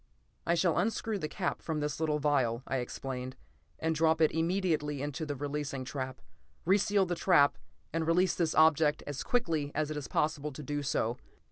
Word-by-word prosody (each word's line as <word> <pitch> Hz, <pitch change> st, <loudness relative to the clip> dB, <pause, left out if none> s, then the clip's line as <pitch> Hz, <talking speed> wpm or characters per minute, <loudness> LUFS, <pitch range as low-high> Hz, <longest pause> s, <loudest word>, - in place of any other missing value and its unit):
"I 170 Hz, -, +3 dB
shall 170 Hz, 0 st, +2 dB
unscrew 220 Hz, -1 st, -1 dB
the 155 Hz, -, -2 dB
cap 180 Hz, +3 st, -3 dB
from 160 Hz, -2 st, -2 dB
this 150 Hz, 0 st, -2 dB
little 155 Hz, -2 st, +1 dB
vial," 130 Hz, -5 st, +1 dB
I 135 Hz, -, -1 dB
explained, 130 Hz, +1 st, -5 dB, 0.4 s
"and 160 Hz, 0 st, 0 dB
drop 160 Hz, 0 st, +3 dB
it 155 Hz, -2 st, +4 dB
immediately 160 Hz, -3 st, 0 dB
into 150 Hz, +2 st, -4 dB
the 145 Hz, -, -2 dB
releasing 140 Hz, -1 st, -3 dB
trap. 130 Hz, -1 st, -5 dB, 0.4 s
Re 190 Hz, +4 st, +4 dB
seal 200 Hz, -1 st, +2 dB
the 175 Hz, -, -2 dB
trap 165 Hz, -5 st, +4 dB, 0.4 s
and 165 Hz, -1 st, -1 dB
release 180 Hz, +2 st, +3 dB
this 165 Hz, -3 st, 0 dB
object 155 Hz, -1 st, +4 dB
as 145 Hz, -2 st, -4 dB
quickly 160 Hz, -12 st, 0 dB
as 155 Hz, 0 st, 0 dB
it 155 Hz, -, -3 dB
is 140 Hz, -4 st, -5 dB
possible 150 Hz, +1 st, 0 dB
to 150 Hz, -, -8 dB
do 145 Hz, +2 st, -2 dB
so. 120 Hz, -3 st, 0 dB
150 Hz, 190 wpm, -31 LUFS, 145-165 Hz, 0.4 s, it